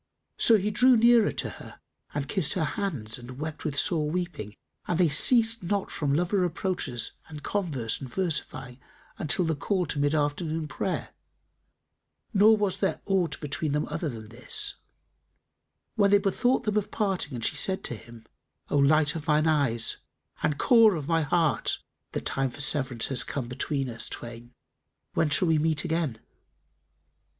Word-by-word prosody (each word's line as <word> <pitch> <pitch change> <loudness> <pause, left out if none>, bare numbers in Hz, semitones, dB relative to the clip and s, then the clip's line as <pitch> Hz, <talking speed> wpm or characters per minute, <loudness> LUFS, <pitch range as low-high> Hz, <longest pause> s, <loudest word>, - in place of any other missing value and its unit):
So 225 - +6
he 210 +1 -1
drew 250 +3 +5
nearer 235 -1 +5
to - - -2
her - - -12 0.3
and 145 -1 -3
kissed 175 -2 +1
her 180 - 0
hands 150 - -3
and 125 +1 -10
wept 155 +1 -5
with 145 -3 -3
sore 155 -2 +1
weeping 165 - -4 0.3
and 175 - 0
they 175 -2 +4
ceased 225 - +4
not 195 +2 -2
from 145 -2 -1
lover 175 +7 +1
reproaches 175 -8 -2 0.2
and 150 -2 -10
converse 145 - -2
and 130 -3 -7
versifying, 135 -8 -3 0.4
until 170 +4 0
the 160 -1 0
call 185 +5 -1
to 150 - -4
mid 145 +2 +1
afternoon 155 +2 -1
prayer - - -3 1.2
(nor 215 +2 +6
was 205 -3 -1
there 195 - -1
aught 180 -7 0
between 150 0 -2
them 150 +1 0
other 165 - -3
than 110 -4 -8
this), 405 - 0 1.2
when 200 -3 +3
they 205 - +6
bethought 245 +7 +1
them 215 -2 0
of 210 - -1
parting 190 - -2
and 115 - -3
she - - 0
said 190 -1 0
to 120 - -3
him, 115 0 -14 0.5
"O - - +2
light 150 +2 +4
of 160 0 -6
mine 155 0 +3
eyes 140 -8 +2 0.4
and 150 - 0
core 225 - +5
of 150 -3 -5
my 165 -1 +2
heart, 160 -1 +1 0.4
the - - -2
time 135 0 -1
of 145 - -3
severance 130 -6 +1
has 135 -3 +2
come 130 -4 -4
between 135 +2 -2
us 115 -2 -3
twain: 120 +1 -8 0.6
when 155 - +1
shall 150 +5 +2
we 160 -1 +3
meet 155 0 +1
again?" 160 -9 -1
155 Hz, 170 wpm, -27 LUFS, 140-190 Hz, 1.2 s, So